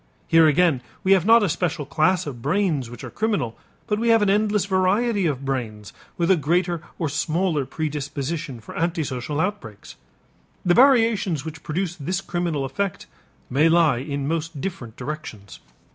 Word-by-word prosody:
Here 165 Hz, -1 st, +6 dB
again 155 Hz, -3 st, +3 dB, 0.2 s
we 190 Hz, -, +2 dB
have 190 Hz, -1 st, +4 dB
not 230 Hz, 0 st, +7 dB
a -, -, +2 dB
special 165 Hz, -3 st, -2 dB
class 175 Hz, +5 st, +1 dB
of 130 Hz, -5 st, -7 dB
brains 155 Hz, -, 0 dB
which 120 Hz, -1 st, -10 dB
are -, -, -7 dB
criminal; 200 Hz, -, -1 dB, 0.3 s
but 210 Hz, 0 st, -1 dB
we 235 Hz, +1 st, +1 dB
have 225 Hz, -2 st, +5 dB
an 200 Hz, -, +3 dB
endless 210 Hz, -1 st, +2 dB
variety 200 Hz, +2 st, +1 dB
of 140 Hz, -3 st, -3 dB
brains 110 Hz, -6 st, -4 dB, 0.2 s
with 170 Hz, +1 st, +2 dB
a -, -, +6 dB
greater 175 Hz, +2 st, 0 dB, 0.2 s
or 165 Hz, -, -1 dB
smaller 155 Hz, 0 st, 0 dB
predisposition 145 Hz, -1 st, -4 dB
for 105 Hz, -, -11 dB
antisocial 150 Hz, -5 st, -2 dB
outbreaks. 160 Hz, -, -4 dB, 0.7 s
The 175 Hz, -, +4 dB
variations 225 Hz, -, +4 dB
which 160 Hz, 0 st, -7 dB
produce 175 Hz, +2 st, -3 dB
this 180 Hz, +5 st, -2 dB
criminal 175 Hz, -7 st, -2 dB
effect 195 Hz, +8 st, -3 dB, 0.4 s
may 150 Hz, +5 st, +3 dB
lie 165 Hz, -6 st, +4 dB
in 140 Hz, +1 st, -3 dB
most 160 Hz, -1 st, -3 dB
different 130 Hz, -, -6 dB
directions. 125 Hz, -8 st, -7 dB
165 Hz, 160 wpm, -23 LUFS, 140-190 Hz, 0.7 s, not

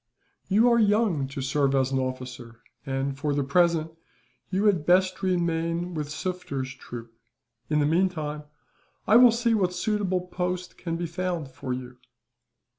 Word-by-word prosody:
"You 215 Hz, +5 st, +4 dB
are 235 Hz, -, +4 dB
young 205 Hz, -9 st, +2 dB
to 135 Hz, 0 st, -5 dB
serve 140 Hz, 0 st, +1 dB
as 135 Hz, 0 st, +1 dB
an 135 Hz, -, +1 dB
officer 125 Hz, -3 st, -6 dB, 0.3 s
and, 135 Hz, +1 st, -1 dB
for 145 Hz, +1 st, -1 dB
the 145 Hz, -, +1 dB
present, 165 Hz, +2 st, +2 dB, 0.6 s
you 195 Hz, +2 st, 0 dB
had 190 Hz, -7 st, +3 dB
best 185 Hz, +3 st, +3 dB
remain 170 Hz, -1 st, 0 dB
with 150 Hz, -3 st, -4 dB
Sufder's 150 Hz, -6 st, -4 dB
troop. 120 Hz, -3 st, -10 dB, 0.6 s
In 150 Hz, -1 st, +2 dB
the 145 Hz, -, +3 dB
meantime, 155 Hz, -3 st, 0 dB, 0.6 s
I 220 Hz, -, +6 dB
will 245 Hz, 0 st, +9 dB
see 235 Hz, 0 st, +1 dB
what 185 Hz, -5 st, +1 dB
suitable 190 Hz, -1 st, 0 dB
post 180 Hz, 0 st, -4 dB
can 165 Hz, -2 st, -4 dB
be 175 Hz, -, -3 dB
found 170 Hz, -4 st, -3 dB
for 130 Hz, 0 st, -6 dB
you." 125 Hz, 0 st, -6 dB
165 Hz, 155 wpm, -26 LUFS, 135-185 Hz, 0.6 s, will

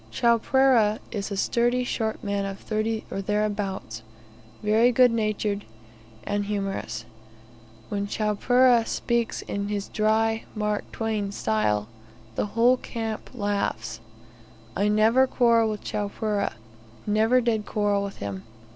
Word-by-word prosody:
Chowpereh 235 Hz, -, +3 dB
is 200 Hz, -3 st, -3 dB
a 200 Hz, -, -4 dB
sturdy 240 Hz, +4 st, +1 dB
short 225 Hz, -2 st, -2 dB
man 200 Hz, -1 st, -1 dB
of 195 Hz, 0 st, -4 dB
thirty 220 Hz, +1 st, -2 dB
or 195 Hz, -, -2 dB
thereabouts; 200 Hz, -, -2 dB, 0.6 s
very 220 Hz, +4 st, +4 dB
good 250 Hz, 0 st, +5 dB
natured, 215 Hz, -2 st, -1 dB, 0.6 s
and 205 Hz, 0 st, -1 dB
humorous. 195 Hz, -, -3 dB, 0.8 s
When 200 Hz, 0 st, -2 dB
Chowpereh 235 Hz, +4 st, +3 dB
speaks 235 Hz, -1 st, -1 dB
in 200 Hz, 0 st, -3 dB
his 205 Hz, -1 st, -3 dB
dry 220 Hz, +1 st, +1 dB
Mark 210 Hz, -1 st, -2 dB
Twain 215 Hz, -3 st, -2 dB
style, 105 Hz, -, 0 dB, 0.5 s
the 160 Hz, -, -1 dB
whole 245 Hz, +2 st, +5 dB
camp 225 Hz, -3 st, -5 dB
laughs. 200 Hz, -, -2 dB, 0.8 s
I 200 Hz, -, +1 dB
never 220 Hz, +5 st, +4 dB
quarrel 230 Hz, -3 st, +3 dB
with 210 Hz, -1 st, -5 dB
Chowpereh, 205 Hz, 0 st, -2 dB, 0.5 s
never 220 Hz, +4 st, +3 dB
did 225 Hz, -4 st, 0 dB
quarrel 205 Hz, -1 st, +1 dB
with 200 Hz, -1 st, -6 dB
him. 100 Hz, -2 st, -5 dB
210 Hz, 120 wpm, -25 LUFS, 200-230 Hz, 0.8 s, good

